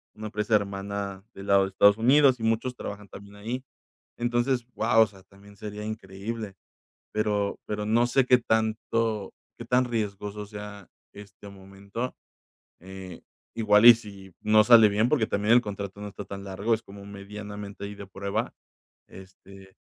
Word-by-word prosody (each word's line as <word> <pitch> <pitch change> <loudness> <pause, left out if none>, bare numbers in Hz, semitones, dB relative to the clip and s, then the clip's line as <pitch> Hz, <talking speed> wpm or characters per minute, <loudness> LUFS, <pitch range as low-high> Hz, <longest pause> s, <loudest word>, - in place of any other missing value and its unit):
una 110 0 -6
empresa 105 +1 0
hermana 100 -1 -3
del 100 +1 -10
lado 100 0 +5
de 95 - -2
Estados 100 +2 +5
Unidos, 130 +2 +5
y - - -7
muchos 115 +3 0
trabajan 105 -3 -7
también 100 +1 -13
ahí. 115 +5 -5 0.5
Entonces, 120 +1 0
guau, 110 0 +4
o 110 - +5
sea, 95 -2 -17
también 100 +1 -18
sería 105 +1 -7
increíble, 105 0 -6 0.6
pero 105 -2 0
pero 105 0 -3
no 115 +3 +3
sé, 125 +1 +2
qué 125 - +6
tanto 110 -2 -1 0.3
qué - - -7
tan 125 +1 +3
riesgoso 105 -3 -4
sea 105 -2 -9 0.3
este 100 0 -13
momento. 100 +5 -7 0.7
Eh, 95 -1 -10 0.3
igual 105 -1 +4
y 120 - +13
si 100 -4 -12
no 110 0 +5
sale 115 -2 +8
bien, 105 +3 +2
porque 125 -7 +2
también 105 +3 +2
el 120 - +6
contrato 100 -2 -6
no 105 - -5
está 100 0 -9
tan 100 0 -8
largo, 100 +4 -1
es 110 - 0
como 100 0 -12
medianamente 100 0 -8
ahí 105 0 -7
de 100 -1 -10
prueba, 100 +1 -3 0.6
este, 95 0 -15
105 Hz, 165 wpm, -26 LUFS, 100-110 Hz, 0.7 s, y